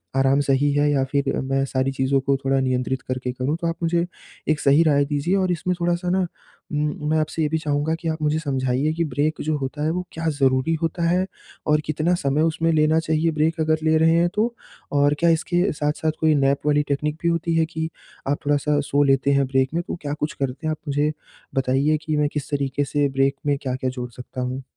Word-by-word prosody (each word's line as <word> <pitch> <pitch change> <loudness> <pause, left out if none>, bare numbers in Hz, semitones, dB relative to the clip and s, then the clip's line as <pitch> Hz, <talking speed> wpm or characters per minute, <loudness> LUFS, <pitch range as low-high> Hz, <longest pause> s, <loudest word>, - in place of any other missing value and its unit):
आराम 135 +1 +3
सही 140 +1 +2
है 145 +1 +3
या 135 -2 +2
फिर 140 -1 +1
मैं 135 +1 0
सारी 130 0 0
चीज़ों 135 0 +1
को 140 +1 +1
थोड़ा 135 0 +2
नियंत्रित 130 0 -1
करके 130 0 -3
करूँ 130 +4 -2
तो 170 - 0
आप 165 - -1
मुझे 170 +1 +1 0.4
एक 155 -1 +2
सही 140 +4 +5
राय 145 -3 +3
दीजिए 145 +6 0
और 185 -2 +1
इसमें 180 +1 -1
थोड़ा-सा 175 +1 0
ना 185 +2 +2 0.5
उम, 150 0 -2
मैं 155 - +2
आपसे 155 +1 -2
ये 150 - +1
भी 160 - 0
चाहूँगा 150 0 0
कि 165 - -5
आप 160 0 -3
मुझे 150 +1 +1
समझाइए 135 0 0
कि 170 +1 0
ब्रेक 150 +1 -1
जो 155 0 0
होता 140 +2 -4
है 155 - +1
वो 180 +2 -3
क्या 165 0 -4
ज़रूरी 130 +3 +2
होता 165 +1 -1
है 180 +2 +2 0.4
और 150 0 +3
कितना 155 +3 0
समय 140 +2 +1
उसमें 165 +1 +1
लेना 155 +1 +3
चाहिए 160 0 +1
ब्रेक 160 +2 0
अगर 155 0 +2
ले 160 0 +3
रहे 160 +1 +4
हैं 170 +1 +3
तो? 230 +3 0 0.4
और 145 0 +3
क्या 170 - +4
इसके 175 +3 +1
साथ-साथ 150 +1 -1
कोई 155 -1 +4
नैप 140 0 +2
वाली 150 0 +3
टेक्निक 150 +2 -1
भी 170 - 0
होती 170 0 0
है 165 0 +3
कि 160 0 -4 0.4
आप 145 +1 +1
थोड़ा-सा 145 0 +2
सो 145 +1 +3
लेते 135 0 +3
हैं 140 0 +3
ब्रेक 130 0 +1
में 170 +1 0
तो - - -3
क्या 145 -1 -3
कुछ 150 +1 -2
करते 135 +3 -3
हैं? - - +1
आप 155 - -3
मुझे 145 +1 +1 0.4
बताइए 135 +3 +2
कि 155 -2 0
मैं 150 0 +2
किस 145 -2 -4
तरीके 140 0 0
से 145 +1 +1
ब्रेक 135 0 +1
में 145 -1 +2
क्या-क्या 130 -1 -2
जोड़ 125 -1 -5
सकता 125 +1 -7
हूँ? 130 +1 -3
150 Hz, 230 wpm, -23 LUFS, 135-160 Hz, 0.5 s, सही